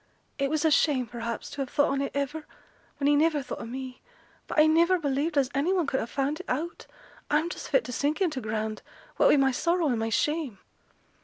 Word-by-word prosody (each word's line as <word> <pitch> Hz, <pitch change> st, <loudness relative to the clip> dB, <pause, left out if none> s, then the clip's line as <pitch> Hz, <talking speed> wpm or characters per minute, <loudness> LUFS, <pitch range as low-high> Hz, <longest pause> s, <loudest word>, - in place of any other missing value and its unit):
It 275 Hz, 0 st, +1 dB
was 310 Hz, +1 st, 0 dB
a 315 Hz, -, +4 dB
shame, 285 Hz, -4 st, +3 dB
perhaps, 235 Hz, 0 st, -5 dB
to 285 Hz, -1 st, -5 dB
have 265 Hz, -, -3 dB
thought 285 Hz, -, +2 dB
on 275 Hz, 0 st, 0 dB
it 280 Hz, -, -3 dB
iver, 295 Hz, +2 st, -3 dB, 0.5 s
when 280 Hz, -, -2 dB
he 290 Hz, +1 st, +5 dB
niver 300 Hz, -1 st, +2 dB
thought -, -, -6 dB
o' -, -, -6 dB
me; 255 Hz, +1 st, -7 dB, 0.5 s
but -, -, -5 dB
I 305 Hz, -, +7 dB
niver 335 Hz, +4 st, +4 dB
believed 295 Hz, 0 st, -1 dB
as 275 Hz, -1 st, +2 dB
any 280 Hz, +7 st, +1 dB
one 365 Hz, -4 st, +2 dB
could 270 Hz, -1 st, 0 dB
ha' -, -, -3 dB
found 280 Hz, +3 st, -1 dB
it 370 Hz, -, -9 dB
out. 320 Hz, +7 st, -3 dB, 0.4 s
I'm 310 Hz, +3 st, +2 dB
just -, -, -7 dB
fit -, -, +3 dB
to -, -, -7 dB
sink 290 Hz, -, -1 dB
into 315 Hz, -9 st, 0 dB
t' 220 Hz, -, -8 dB
ground, 215 Hz, 0 st, -2 dB, 0.4 s
what -, -, +5 dB
wi' -, -, +6 dB
my 270 Hz, -1 st, +4 dB
sorrow 335 Hz, +4 st, +1 dB
and 240 Hz, -3 st, 0 dB
my 225 Hz, 0 st, -1 dB
shame.' 295 Hz, -1 st, 0 dB
285 Hz, 235 wpm, -27 LUFS, 260-315 Hz, 0.5 s, I